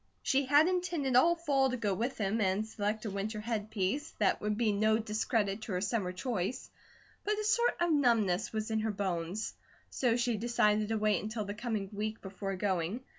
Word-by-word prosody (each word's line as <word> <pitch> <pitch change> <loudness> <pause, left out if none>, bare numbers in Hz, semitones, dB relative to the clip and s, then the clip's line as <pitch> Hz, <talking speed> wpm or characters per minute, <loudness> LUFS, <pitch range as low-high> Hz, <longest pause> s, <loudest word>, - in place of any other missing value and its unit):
She 270 0 +2
had 295 +4 +6
intended 350 -8 0
all 335 +7 +6
fall 280 -5 +2
to 255 - -2
go 210 -4 0
with 235 +7 -2
him 215 +2 0
and 200 +2 +1
select 215 +1 -2
a 210 - -2
winter 210 +2 -3
headpiece 215 +4 -2
that 205 - +2
would 210 0 -1
be 225 -2 +2
no 215 +2 +3
discredit 215 -1 -1
to 215 - -5
her 180 - -1
summer 200 -2 -1
choice, 190 +3 -3 0.5
but 420 +1 0
a 425 - -2
sort 470 +3 +2
of 345 -1 +2
numbness 225 - +2
was 220 0 -3
in 220 - +1
her 220 +1 -1
bones; 190 -1 -2 0.4
so 245 -3 +1
she 240 -2 0
decided 215 -2 +2
to 225 +1 0
wait 210 -3 +2
until 215 0 -4
the 200 - -4
coming 215 -2 -3
week 215 +2 -3
before 195 0 -5
going. 190 +3 -1
215 Hz, 195 wpm, -32 LUFS, 200-245 Hz, 0.5 s, had